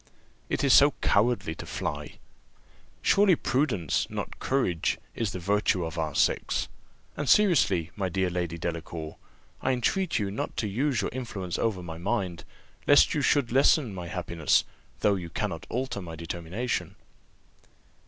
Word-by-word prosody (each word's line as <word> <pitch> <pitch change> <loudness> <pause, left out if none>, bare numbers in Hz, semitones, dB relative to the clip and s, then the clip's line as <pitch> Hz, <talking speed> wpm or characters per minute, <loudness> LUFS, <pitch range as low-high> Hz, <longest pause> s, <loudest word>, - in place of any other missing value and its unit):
"It 135 - -1
is 135 -3 +5
so 145 0 +7
cowardly 110 -5 +2
to - - -8
fly!" 75 0 -4 0.9
"Surely 195 -3 +5
prudence, 125 - 0
not - - -5
courage, 110 -12 0 0.2
is 110 -4 -2
the - - -5
virtue 95 -1 +1
of 80 0 -5
our 80 -3 -2
sex; - - +1 0.5
and 145 -3 -3
seriously, 105 - +4
my 95 -3 -1
dear 95 0 0
Lady 85 -1 -2
Delacour, 80 -1 -5 0.4
I 130 - +1
entreat 170 - 0
you 100 -3 -1
not 105 - -4
to 110 - 0
use 130 +4 0
your - - -2
influence 105 -8 -4
over 100 -6 -1
my 80 -1 -7
mind, 85 -1 -2 0.4
lest 145 - +6
you 150 - 0
should 140 -3 +2
lessen 135 -2 +4
my 90 -2 -6
happiness, 85 -3 +1 0.4
though 105 - +4
you 90 -3 -4
cannot - - -4
alter 125 -4 -2
my 85 -2 -7
determination." 85 +8 -4
100 Hz, 150 wpm, -27 LUFS, 85-130 Hz, 0.9 s, so